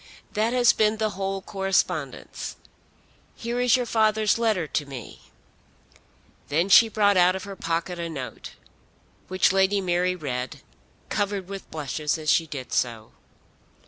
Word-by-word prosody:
That 220 +2 +1
has 245 -1 +5
been 215 0 +2
the 215 -1 0
whole 195 0 -3
correspondence. 185 -7 -2 0.8
Here 235 +1 -3
is 250 -1 +4
your 250 - -1
father's 220 -1 +2
letter 215 -7 +1
to 150 -1 -2
me." 130 -4 -10 1.2
Then 165 +6 +1
she 225 +3 +8
brought 205 -2 +3
out 180 +1 +5
of 190 - -5
her 200 -1 -7
pocket 170 +1 -2
a 170 0 -3
note, 135 -6 -7 0.7
which 185 0 +2
Lady 195 +1 +3
Mary 180 -1 +1
read, 130 -6 -5 0.5
covered 200 -2 -1
with 195 0 -8
blushes 150 0 -2
as 155 -1 0
she 165 - +2
did 135 -4 -7
so. 115 -3 -1
190 Hz, 145 wpm, -25 LUFS, 155-210 Hz, 1.2 s, she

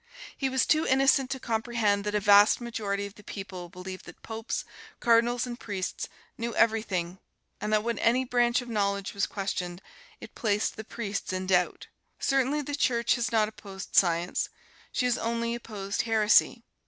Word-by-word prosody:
He 270 - -1
was 260 -1 +2
too 310 +1 +2
innocent 270 0 +4
to 265 0 -3
comprehend 225 -3 0
that 210 0 -1
a - - +3
vast 205 0 +6
majority 210 -4 -3
of 200 - -8
the 210 - -16
people 190 -3 -7
believed 185 +1 -8
that 175 - -13
popes, 225 0 -4 0.3
cardinals 235 +1 +3
and 245 0 -6
priests 195 -3 -4 0.3
knew 230 0 -3
everything, 195 -6 +1 0.4
and 210 - -2
that 215 0 +3
when 235 -2 -2
any 255 +3 +3
branch 240 0 +2
of - - -12
knowledge 200 -3 -1
was 200 - 0
questioned 180 -3 -3 0.4
it - - -11
placed 210 -2 0
the 220 - -7
priests 210 -3 -4
in 185 0 -2
doubt. 180 -1 +1 0.3
Certainly 275 +2 +1
the 290 - -5
Church 235 -5 +2
has 240 0 -1
not 220 -2 +3
opposed 200 -2 -9
Science 175 -1 +2 0.4
she 250 - 0
has 250 -1 +1
only 230 0 -1
opposed 205 -4 -3
heresy. 225 +1 +3
220 Hz, 170 wpm, -28 LUFS, 200-240 Hz, 0.4 s, vast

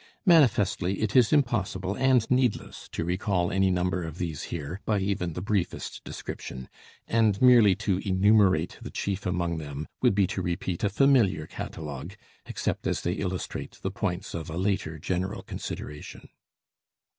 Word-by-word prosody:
Manifestly, 105 - +3
it 105 - -1
is 125 -4 +6
impossible 100 -9 +1
and 130 -2 +3
needless 125 -3 0
to 80 - -3
recall 90 0 0
any 95 0 +3
number 90 0 0
of 80 0 -6
these 85 -5 -3
here 85 +4 -5
by 105 - +1
even 95 -3 -1
the 90 - -5
briefest 100 -3 -2
description; 65 -1 -7 0.4
and 110 -3 +2
merely 120 -6 +7
to 95 0 0
enumerate 95 -3 +3
the - - -7
chief 100 0 -3
among 85 -2 -1
them 70 -1 -6
would - - +4
be 100 -1 +4
to - - -3
repeat 85 0 -3
a 100 - +3
familiar 105 - +3
catalogue, 75 +5 -7 0.3
except - - -2
as - - -1
they 85 - -1
illustrate 95 -2 -4
the 95 - -1
points 95 -2 -3
of 80 -1 -5
a 80 - -5
later 95 -4 -1
general 95 +5 -3
consideration. 75 0 -7
95 Hz, 155 wpm, -27 LUFS, 85-105 Hz, 0.4 s, merely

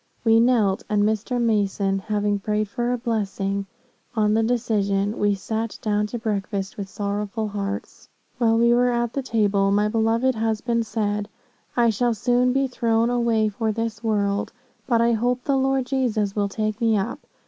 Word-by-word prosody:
We 225 -1 +5
knelt, 230 -5 +3
and 210 -1 +2
Mr. 220 +3 0
Mason 200 -4 +1
having 205 0 -1
prayed 210 +1 -1
for 240 +4 -2
a 250 - 0
blessing 200 -4 -2 0.5
on 210 -1 +2
the 225 - +3
decision, 210 -3 0
we 205 -1 +2
sat 220 +3 -4
down 210 -1 0
to 240 - -5
breakfast 200 -3 -3
with 200 -2 -6
sorrowful 205 +2 -3
hearts. 200 -1 -5 0.3
"While 225 -2 +3
we 235 +1 +4
were 245 +1 +3
at 240 -1 -1
the 275 - -1
table, 205 -5 +1
my 205 +1 +2
beloved 230 +3 +2
husband 225 +1 -1
said, 210 -2 -2 0.5
'I 235 -1 +4
shall 235 +3 +1
soon 245 +3 +2
be 270 +1 +2
thrown 230 -2 +1
away 230 -3 +2
for 220 +2 -1
this 225 0 -4
world; 205 -2 0 0.4
but 235 -3 +3
I 235 0 +3
hope 245 +2 0
the 280 - +1
Lord 270 -1 +1
Jesus 230 -7 0
will 205 -1 0
take 215 +2 -3
me 225 -2 +3
up. 195 - -2
220 Hz, 170 wpm, -23 LUFS, 205-235 Hz, 0.5 s, We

